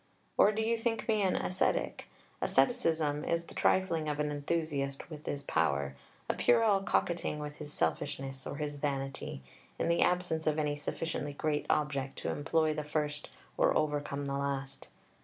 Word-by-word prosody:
Or 210 - +6
do 220 +1 -1
you 230 +1 +1
think 225 -1 -1
me 215 -2 +3
an 190 -2 +2
Ascetic? 185 - 0 0.3
Asceticism 160 - +2
is 170 0 0
the - - -12
trifling 165 -5 +2
of 150 0 -2
an 150 0 +1
enthusiast 145 -1 -2
with 150 -1 -9
his 140 -1 -2
power, 70 - +1 0.3
a - - +1
puerile 200 - +4
coquetting 175 -4 0
with 150 0 -6
his 150 -1 -7
selfishness 135 - -2
or - - -4
his 145 -1 -3
vanity, 135 - -3 0.3
in - - 0
the 170 - +3
absence 180 -3 +2
of 155 0 +2
any 150 -1 +1
sufficiently 145 0 -3
great 150 0 -1
object 140 -3 0
to - - -3
employ 155 +1 +1
the 150 0 -3
first 150 0 -2 0.3
or - - +4
overcome 145 -2 -1
the 140 - -2
last. 140 -1 -3
150 Hz, 165 wpm, -32 LUFS, 140-165 Hz, 0.3 s, Or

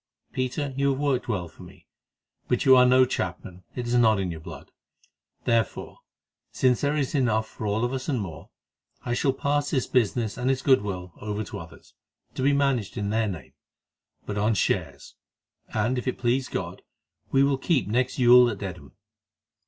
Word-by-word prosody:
Peter, 130 +2 -2
you 140 +1 +1
have 135 -1 -1
worked 140 -4 0
well 95 -7 -2
for - - -17
me, - - -14 0.6
but 125 - 0
you 130 -1 +8
are 125 0 +6
no 130 +1 +6
chapman; 90 -4 -5
it 125 - -3
is 120 - -2
not 110 -4 +4
in 95 -2 -2
your 80 - -7
blood. 80 - -11 0.7
Therefore, 115 -1 -1 0.5
since 125 -2 +2
there 145 +1 +1
is 140 -3 -1
enough 115 -6 +1
for 110 - -6
all 110 +3 0
of 120 - -3
us 130 +3 -4
and 130 -4 0
more, 85 -8 -7 0.5
I 120 - -2
shall 135 +2 +2
pass 145 +2 -1
this 130 -5 0
business 115 -2 0
and 125 +1 0
its 135 0 0
goodwill 100 - +1
over 105 0 -3
to - - -7
others, 80 -1 -13 0.4
to - - -5
be 140 +2 +3
managed 135 -7 0
in 100 0 -2
their 110 0 +1
name, 90 -8 -7 0.7
but 105 0 -3
on 110 +2 +2
shares, 90 - -2 0.6
and 115 +4 0
if 125 - -7
it 130 - -1
please 125 +2 0
God - - -5 0.5
we 135 0 +4
will 140 -1 +1
keep 140 - +1
next 125 +4 0
Yule 125 0 +7
at 105 - -4
Dedham." 90 -9 -8
120 Hz, 185 wpm, -26 LUFS, 105-130 Hz, 0.7 s, you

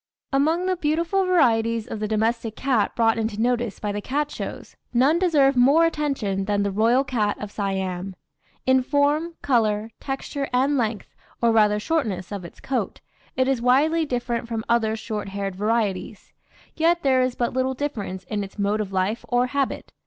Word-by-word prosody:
Among 320 +6 +2
the 370 0 +1
beautiful 335 +4 0
varieties 230 -10 +2
of 225 - -6
the 215 - -2
domestic 220 +1 -1
cat 250 -6 0
brought 225 -1 +2
into 220 -1 -2
notice 240 -2 0
by 210 - -2
the 205 0 -3
cat 290 +5 -2
shows, - - -7 0.2
none 270 +7 +3
deserve 290 -7 +3
more 280 +7 +5
attention 270 -12 -1
than 205 0 +1
"The 200 - -1
Royal 230 +6 +3
Cat 225 -6 -1
of 210 -1 -6
Siam." 190 -2 -3 0.5
In 260 0 +4
form, 290 +5 +1
colour, 220 -4 +1
texture, 275 +1 -4
and 265 +3 +2
length, 225 -4 -2 0.3
or 235 -1 +3
rather 210 -2 +4
shortness 210 - -2
of 200 -3 -5
its 170 - -11
coat, 265 -2 -3 0.4
it 260 0 +2
is 265 -3 +1
widely 295 +7 +3
different 240 -4 -2
from 225 -1 -4
other 225 -2 +2
short 215 -2 -5
haired 195 -1 -4
varieties; 210 -1 -2 0.4
yet 340 +2 +2
there 260 -2 +3
is 255 -1 0
but 240 - -1
little 260 +1 0
difference 215 -10 -4
in 205 +3 -3
its 195 - -10
mode 205 +1 0
of 200 -2 -5
life 195 +4 -1
or 245 0 +3
habit. 280 -2 -2
235 Hz, 175 wpm, -24 LUFS, 210-275 Hz, 0.5 s, more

